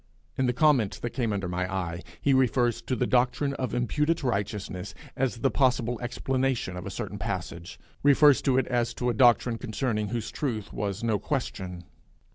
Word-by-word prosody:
In 130 - +1
the - - +3
comment 125 -6 +3
that 120 - -2
came 120 -4 -1
under 100 -2 -2
my 90 +1 -2
eye, 90 -3 -3 0.2
he 140 - +2
refers 125 -2 +2
to 130 - -2
the 125 - 0
doctrine 125 +3 +2
of 130 - -2
imputed 150 +7 0
righteousness 100 -5 -3 0.2
as 130 -2 0
the 135 +3 +1
possible 125 -3 +1
explanation 130 -4 -1
of 90 - -6
a - - -3
certain - - -5
passage 85 +2 -5 0.2
refers 145 0 +6
to 130 -2 +2
it 130 - +3
as 120 -2 -1
to 125 -1 0
a - - -2
doctrine 120 0 +4
concerning 110 -3 -2
whose 110 +1 -3
truth 115 -8 -3
was 100 +1 -3
no 110 -3 +1
question. 95 -9 -3
120 Hz, 180 wpm, -27 LUFS, 105-130 Hz, 0.2 s, refers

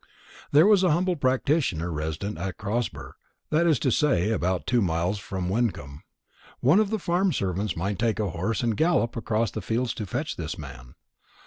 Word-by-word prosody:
There 150 +4 +6
was 205 -2 +5
a 185 - +3
humble 180 +3 +1
practitioner 130 - 0
resident 80 +7 -4
at 95 +1 -4
Crosber, 110 +4 -4 0.3
that 165 +3 +3
is 160 -4 +4
to 130 - +2
say, 110 - +2
about 90 -4 -1
two 120 -1 +2
miles 90 +2 0
from 95 -2 -4
Wyncomb. 95 - -2 0.6
One 145 +11 +4
of 215 -2 +2
the 220 - 0
farm 185 0 +1
servants 95 - -2
might 100 +4 -2
take 115 -2 0
a 105 -4 -1
horse 100 +9 -2
and 115 -2 +1
gallop 160 -5 +1
across 115 -1 -1
the - - -5
fields 115 +1 -1
to 105 - -5
fetch 150 +10 -3
this 80 -1 -4
man. 60 -4 -10
110 Hz, 185 wpm, -26 LUFS, 90-145 Hz, 0.6 s, There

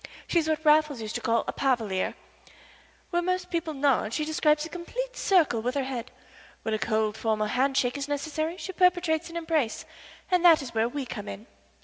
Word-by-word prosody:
She 345 - +2
is 315 -1 -1
what 315 0 -1
Raffles 300 -3 +4
used 220 -1 -5
to - - -3
call 230 0 +1
a - - -2
palaverer. 225 -8 0 1.0
Where 345 0 +2
most 365 0 -2
people 330 -3 -2
nod 270 -5 +1
she 305 - -1
describes 305 0 +2
a - - -8
complete - - -5
circle 320 - +3
with 250 +4 -2
her 280 - +1
head. 250 -2 -5 0.5
When 220 - -1
a 215 - 0
cold, 220 -1 0
formal 215 -1 0
handshake 265 +3 +1
is 280 - -3
necessary 310 +3 -2
she 380 - -5
perpetrates 355 -3 +2
an 335 - -6
embrace, 320 -8 -1 0.5
and 360 -1 +3
that 330 -4 +7
is 250 - -8
where 225 +1 +1
we 280 +1 -4
come 210 -4 -7
in. 210 - -7
290 Hz, 200 wpm, -27 LUFS, 235-335 Hz, 1.0 s, that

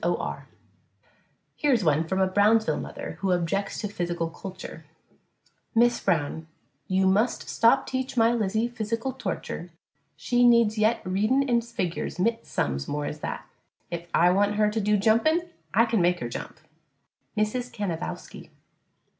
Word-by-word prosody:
O'R - - -2 1.1
Here 295 - +1
is 235 -6 +3
one 155 0 +2
from 190 +2 -1
a 190 - +4
Brownsville 210 +4 +3
mother - - -7
who 195 -1 0
objects 180 +3 -1
to 210 - -2
physical 175 -4 -3
culture: 185 -2 -9 0.9
Miss 240 +1 +4
Brown: 160 -3 -1 0.4
You 190 0 +2
must 210 +6 +1
stop 250 +4 +3
teach 260 -1 -3
my 230 0 +5
Lizzie 220 0 0
fisical 230 +2 -3
torture 265 - -5 0.5
she 245 0 +1
needs 235 -3 +5
yet 220 +2 +2
readin' 215 +9 +1
an' 240 -2 +3
figors 205 -10 -4
mit 230 +5 0
sums 70 -1 -2
more 145 0 -2
as 150 - -5
that, - - -5 0.5
if 170 0 -5
I 175 +1 +4
want 205 +2 +2
her 210 0 +2
to 220 +1 -1
do 210 +1 +2
jumpin' 235 - +2 0.2
I 230 - +4
kin 225 -4 +1
make 175 +1 +2
her 120 - -4
jump. 120 - -7 0.8
MRS. 240 +4 -1
CANAVOWSKY. 180 -6 -5
210 Hz, 150 wpm, -26 LUFS, 180-235 Hz, 1.1 s, my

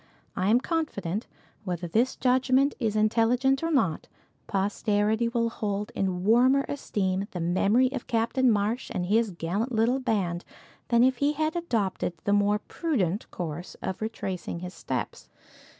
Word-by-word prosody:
I 190 - 0
am 235 +3 +5
confident, 230 - -2 0.4
whether 175 -3 -3
this 235 +9 +1
judgment 260 +2 +3
is 215 -2 0
intelligent 235 +5 +2
or 330 - -1
not, 195 - +1 0.4
posterity 205 +3 +1
will 230 -1 0
hold 210 0 -3
in 185 -2 -1
warmer 255 +6 +4
esteem 195 -8 -2
the 180 - -6
memory 200 +9 +2
of 265 -3 -5
Captain 235 +3 +2
Marsh 220 +4 0
and 180 -2 -1
his 220 +4 +2
gallant 190 +7 -2
little 235 +3 +2
band 195 -9 -1 0.4
than 235 0 +4
if 260 0 +3
he 285 +3 +2
had 310 +2 -1
adopted 225 - -1
the 205 - +1
more 205 0 +3
prudent 210 - -2
course 170 0 -6
of 190 - -4
retracing 190 -6 -4
his 180 0 -6
steps. - - -5
220 Hz, 150 wpm, -27 LUFS, 190-255 Hz, 0.4 s, am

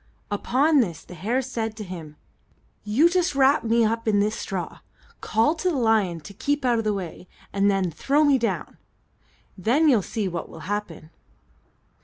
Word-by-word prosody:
Upon 275 +9 +2
this 180 -10 -1
the - - -12
hare 225 +10 -1
said 225 -4 -4
to 215 - -5
him: 165 -5 -8 0.7
"You 225 +11 +4
just 350 -3 0
wrap 275 +2 +4
me 230 +1 +3
up 230 +1 -1
in 205 -2 +3
this 210 +2 +1
straw, 190 -3 -5 0.4
call 225 +7 +2
to 355 +3 -1
the 340 - -1
lion 215 -8 +1
to 200 - -11
keep 285 +6 -1
out 240 -2 +3
of - - -1
the 215 -1 0
way, 180 -1 -7 0.3
and 200 0 +3
then 195 -3 +1
throw 280 - +1
me 285 -3 +4
down. 230 - -3 0.8
Then 245 - +2
you'll 245 -8 +5
see 210 +1 -3
what 170 -2 -5
will 165 - -11
happen." 180 -4 -5
220 Hz, 180 wpm, -24 LUFS, 195-265 Hz, 0.8 s, you'll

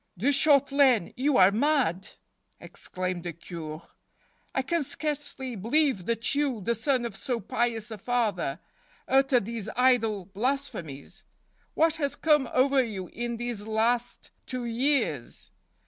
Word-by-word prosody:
" - - -41
De 235 +11 +1
Shautelaine, 280 - +4
you 270 +2 +1
are 185 +1 +7
mad! 235 - +1 0.3
" - - -49
exclaimed 185 -1 -5
the 170 -1 -5
Cure. 160 -1 -8 0.3
" - - -37
I 265 - +1
can 335 +4 0
scarcely 280 -3 -4
believe 235 - +1
that 230 +1 0
you, 280 -5 0
the 220 +4 0
son 245 +2 0
of 230 -4 -5
so 245 0 -3
pious 230 +1 -2
a 215 - -7
father, 200 - -1 0.5
utter 270 -1 +4
these 225 -1 -5
idle 225 -6 +2
blasphemies. 195 - -4 0.5
What 325 0 +3
has 285 -3 -1
come 300 -5 +2
over 270 +1 +3
you 195 -6 -6
in 235 0 -4
these 235 -3 -4
last 235 +2 -1 0.2
two 255 -1 -4
years? 235 - -1
240 Hz, 145 wpm, -27 LUFS, 200-270 Hz, 0.5 s, are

